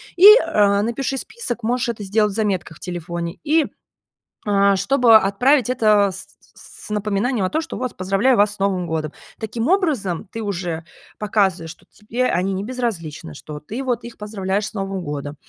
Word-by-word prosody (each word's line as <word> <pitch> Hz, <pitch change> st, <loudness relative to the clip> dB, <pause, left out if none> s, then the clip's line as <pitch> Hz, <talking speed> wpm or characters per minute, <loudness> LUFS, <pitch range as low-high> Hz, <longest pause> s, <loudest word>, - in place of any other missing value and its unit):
И, 360 Hz, +2 st, +6 dB
э, 205 Hz, -, +6 dB
напиши 255 Hz, +5 st, -2 dB
список, 245 Hz, -, -5 dB
можешь 245 Hz, +2 st, 0 dB
это 215 Hz, -3 st, -4 dB
сделать 210 Hz, +1 st, +1 dB
в -, -, -8 dB
заметках 190 Hz, -7 st, -2 dB
в -, -, -26 dB
телефоне, 170 Hz, 0 st, -5 dB
и, 310 Hz, 0 st, +3 dB, 0.8 s
а, 200 Hz, -1 st, +3 dB
чтобы 230 Hz, +3 st, +5 dB
отправить 240 Hz, +6 st, +2 dB
это 215 Hz, -5 st, +3 dB
с -, -, -9 dB, 0.3 s
с -, -, -15 dB
с -, -, -10 dB
напоминанием 210 Hz, +2 st, 0 dB
о -, -, -1 dB
том, 315 Hz, -, 0 dB
что -, -, -7 dB
вот: 255 Hz, -1 st, -4 dB
"Поздравляю 195 Hz, +7 st, +2 dB
вас 205 Hz, 0 st, +3 dB
с -, -, -20 dB
Новым 195 Hz, -2 st, 0 dB
годом!" 160 Hz, -2 st, -2 dB, 0.3 s
Таким 225 Hz, +3 st, -3 dB
образом, 250 Hz, -, 0 dB
ты 225 Hz, -, -5 dB
уже 175 Hz, -5 st, -3 dB, 0.3 s
показываешь, 190 Hz, -6 st, 0 dB
что 165 Hz, -, -17 dB
тебе 235 Hz, +4 st, -3 dB
они 185 Hz, +3 st, 0 dB
не 190 Hz, +1 st, -3 dB
безразличны, 205 Hz, -, -4 dB
что 150 Hz, -, -9 dB
ты 225 Hz, -, -6 dB
вот 245 Hz, -3 st, -1 dB
их 235 Hz, 0 st, -10 dB
поздравляешь 200 Hz, -1 st, -2 dB
с -, -, -9 dB
Новым 195 Hz, -2 st, -3 dB
годом. 145 Hz, -1 st, -5 dB
205 Hz, 180 wpm, -21 LUFS, 185-240 Hz, 0.8 s, И